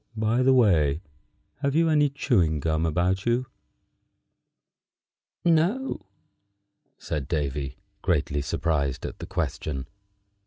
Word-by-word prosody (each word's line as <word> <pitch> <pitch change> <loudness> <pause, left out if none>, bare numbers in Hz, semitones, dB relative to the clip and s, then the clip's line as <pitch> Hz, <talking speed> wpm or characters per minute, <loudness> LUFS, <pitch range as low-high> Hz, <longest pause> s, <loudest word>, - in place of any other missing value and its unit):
By 110 +3 +2
the 130 +1 +5
way, 85 - +3 0.6
have 140 0 0
you 165 +1 +4
any 150 -2 +4
chewing 95 - +1
gum 80 +2 0
about 90 +5 0
you?" 120 +2 +2 2.0
"No," 170 - +1 0.9
said 70 -3 -4
Davy, 70 -4 -2 0.2
greatly 70 0 0
surprised 70 -2 -1
at - - -7
the - - -7
question. 70 -4 -3
90 Hz, 105 wpm, -26 LUFS, -, 2.0 s, the